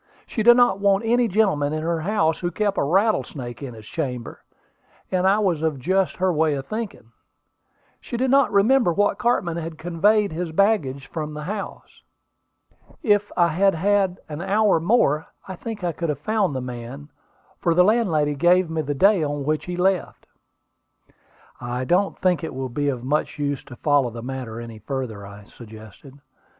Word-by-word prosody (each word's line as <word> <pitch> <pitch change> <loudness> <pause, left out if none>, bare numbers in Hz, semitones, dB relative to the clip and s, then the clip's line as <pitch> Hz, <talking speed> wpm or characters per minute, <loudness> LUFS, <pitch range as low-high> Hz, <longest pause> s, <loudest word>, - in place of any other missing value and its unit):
She 220 - -3
did 240 +2 +7
not 245 -6 +4
want 200 +1 +2
any 240 +1 +3
gentleman 185 -9 +1
in 155 0 -3
her 165 0 -1
house 165 -3 +1
who 175 - -2
kept 205 +3 -1
a - - +2
rattlesnake 150 - 0
in 130 -4 -7
his 110 -1 -12
chamber; 125 -4 -5 0.7
and 185 0 +2
I 195 +2 +4
was 185 -7 0
of 160 -3 0
just 185 +7 0
her 185 -1 +1
way 155 -1 +1
of 135 -1 -5
thinking. 215 - -6 0.9
She 240 - -6
did 255 +1 +1
not 275 -1 +4
remember 215 +1 +4
what 205 +4 +1
cartman 185 -9 0
had 165 -1 -6
conveyed 195 +6 +2
his 165 +1 -4
baggage 160 -8 +1
from 155 -2 -6
the 150 - -6
house. 200 +4 -7 1.0
If 205 -4 +2
I 170 -1 +4
had 195 +4 +2
had 195 +1 +1
an 150 +1 -6
hour 200 -1 +2
more, 160 - +2 0.2
I 190 - -6
think 220 +1 -7
I 175 - 0
could 165 +1 -4
have 150 - -1
found 200 -1 0
the 130 - -2
man; 125 +3 -8 0.5
for 170 -2 +1
the 180 - +6
landlady 180 -9 +2
gave 175 +3 +3
me 160 -1 -1
the 145 -1 -3
day 195 +5 +4
on 145 -1 -2
which 155 +1 -1
he 180 0 -5
left." 185 0 0 1.3
"I 125 +1 -4
don't 185 +6 +1
think 180 -2 +1
it 160 - -5
will 130 0 -4
be 145 +4 -1
of 125 -3 -4
much 150 +5 -1
use 145 -2 -2
to 120 - -11
follow 145 -2 +2
the 115 0 -8
matter 125 -3 -6
any 115 -2 -9
further," 110 -4 -5
I 100 +1 -12
suggested. 110 +5 -14
165 Hz, 185 wpm, -23 LUFS, 140-200 Hz, 1.3 s, did